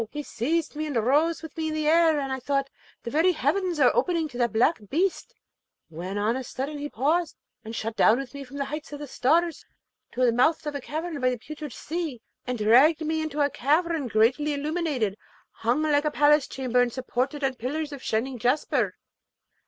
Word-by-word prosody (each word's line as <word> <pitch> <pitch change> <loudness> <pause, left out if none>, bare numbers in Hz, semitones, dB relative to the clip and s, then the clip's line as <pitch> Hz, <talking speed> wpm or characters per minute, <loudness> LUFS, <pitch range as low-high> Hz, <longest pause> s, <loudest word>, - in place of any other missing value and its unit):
he 295 +3 -5
seized 310 +7 -2
me 310 +1 -3
and 290 - -4
rose 295 +9 +2
with 320 - -9
me 320 -1 -2
in 310 - -2
the 310 -1 -1
air, 325 -1 +5
and 270 -1 -3
I 265 - -3
thought 275 +1 -1 0.3
the 235 - -5
very 330 +5 +3
heavens 345 +4 0
were 265 -4 +4
opening 335 -3 +1
to 245 - -9
that 240 -1 +2
black 240 +8 +2
beast, 360 +5 -1 0.5
when 180 +5 -5
on 215 +3 +1
a 260 - -3
sudden 275 +4 -5
he 290 +1 -4
paused, 310 +7 0 0.3
and 225 +1 -7
shot 225 +1 -4
down 225 - +5
with 270 -1 -6
me 280 0 -7
from 275 +1 -10
heights 295 +2 -4
of 290 - -5
the 295 - -7
stars 320 +5 +1 0.5
to 255 - +2
the 240 - +4
mouth 255 +8 +2
of 295 - -3
a 285 - -4
cavern 315 +3 -4
by 255 - +3
the 250 - -2
Putrid 300 +3 -8
Sea, 315 -2 -4 0.3
and 250 -1 -2
dragged 255 +10 +5
me 315 +1 0
into 305 -1 -2
a 285 -1 +2
cavern 310 +1 +1
greatly 255 +7 +2
illuminated, 285 - -1 0.3
hung 240 +7 0
like 295 -1 +2
a - - +3
palace 295 -1 +4
chamber, 250 -2 0
and 245 -1 +1
supported 260 +3 -2
on 270 -1 +1
pillars 285 +5 -4
of 280 -2 -8
shining 245 +3 -2
jasper. 250 +7 +1
285 Hz, 205 wpm, -26 LUFS, 250-310 Hz, 0.5 s, air